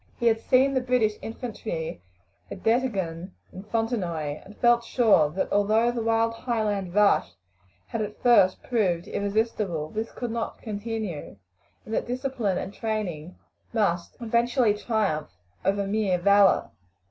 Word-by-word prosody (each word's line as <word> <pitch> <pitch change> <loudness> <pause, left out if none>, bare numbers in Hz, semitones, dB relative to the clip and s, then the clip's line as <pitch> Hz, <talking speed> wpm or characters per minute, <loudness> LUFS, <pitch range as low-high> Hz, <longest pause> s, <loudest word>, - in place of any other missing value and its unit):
He 235 - -2
had 225 -1 +3
seen 265 +2 +3
the 260 - +1
British 250 -4 +2
infantry 220 - -5 0.5
at 190 - -9
Dettingen 195 -8 0 0.2
and 195 +3 -10
Fontenoy, 180 - -2
and 205 +2 -14
felt 240 -1 +4
sure 220 - +4
that 180 +6 -3
although 215 +4 +3
the 240 -1 -3
wild 225 0 +2
Highland 210 -6 -2
rush 210 - +3 0.5
had 230 - -4
at 210 0 -5
first 230 -6 +4
proved 185 -8 0
irresistible, 200 -6 -1
this 220 +1 -3
could 245 -2 -5
nor 230 -1 -3
continue, 215 -6 -5 0.5
and 220 - -7
that - - -1
discipline 245 -6 -1
and 195 - -5
training 185 -8 -4 0.4
must 180 -6 0
eventually 235 0 +2
triumph 205 - -1 0.3
over 200 +1 +1
mere 200 -2 +1
valour. 200 +1 +4
215 Hz, 135 wpm, -26 LUFS, 190-235 Hz, 0.5 s, felt